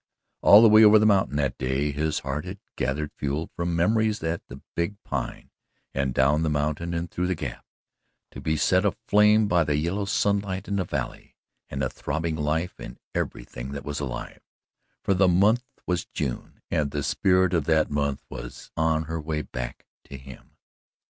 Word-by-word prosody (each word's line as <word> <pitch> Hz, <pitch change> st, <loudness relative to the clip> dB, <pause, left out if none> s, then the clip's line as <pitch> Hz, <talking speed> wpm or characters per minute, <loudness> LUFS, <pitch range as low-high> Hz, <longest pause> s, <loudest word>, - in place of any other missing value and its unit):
All 105 Hz, +3 st, +8 dB
the -, -, +9 dB
way 110 Hz, +1 st, +7 dB
over 105 Hz, 0 st, +8 dB
the 110 Hz, -, +3 dB
mountain 95 Hz, -9 st, +3 dB
that 70 Hz, -4 st, -1 dB
day 65 Hz, +3 st, 0 dB
his 75 Hz, +2 st, -1 dB
heart 70 Hz, +2 st, -3 dB
had 90 Hz, +2 st, -7 dB, 0.2 s
gathered 70 Hz, +4 st, -2 dB
fuel 70 Hz, +3 st, -3 dB
from 85 Hz, 0 st, -1 dB
memories 110 Hz, +3 st, +1 dB
at 80 Hz, +1 st, -1 dB
the -, -, -10 dB
big 85 Hz, +4 st, -1 dB
Pine, 65 Hz, -4 st, -5 dB, 0.4 s
and 70 Hz, -1 st, 0 dB
down 70 Hz, +5 st, +3 dB
the 80 Hz, -, +1 dB
mountain 75 Hz, +3 st, -1 dB
and 85 Hz, 0 st, -3 dB
through 90 Hz, 0 st, -1 dB
the 95 Hz, -, 0 dB
gap, -, -, -6 dB, 0.7 s
to -, -, -9 dB
be 80 Hz, 0 st, 0 dB
set 95 Hz, +5 st, +3 dB
aflame 105 Hz, +1 st, +3 dB
by 90 Hz, -4 st, +3 dB
the 75 Hz, -1 st, 0 dB
yellow 85 Hz, +7 st, -1 dB
sunlight 100 Hz, -1 st, 0 dB
in 100 Hz, -, -1 dB
the 95 Hz, -, 0 dB
valley -, -, -5 dB, 0.3 s
and 70 Hz, 0 st, -3 dB
the -, -, +2 dB
throbbing 80 Hz, 0 st, -3 dB
life 80 Hz, +4 st, -2 dB
in -, -, -9 dB, 0.2 s
everything -, -, -4 dB
that 70 Hz, -, -6 dB
was 75 Hz, -1 st, -3 dB
alive, 65 Hz, -4 st, -6 dB, 0.6 s
for 100 Hz, -, +2 dB
the 95 Hz, 0 st, +4 dB
month 105 Hz, +7 st, +3 dB, 0.2 s
was 90 Hz, -1 st, -1 dB
June 65 Hz, -4 st, -5 dB
and 75 Hz, -2 st, +1 dB
the 70 Hz, 0 st, -3 dB
spirit 95 Hz, +2 st, +2 dB
of 80 Hz, -5 st, +1 dB
that 80 Hz, -1 st, +2 dB
month 70 Hz, -1 st, -1 dB
was -, -, -9 dB
on 80 Hz, 0 st, +1 dB
her 80 Hz, +1 st, -4 dB
way 75 Hz, 0 st, -2 dB
to 65 Hz, +2 st, -8 dB
him. 65 Hz, 0 st, -14 dB
80 Hz, 180 wpm, -25 LUFS, 70-95 Hz, 0.7 s, the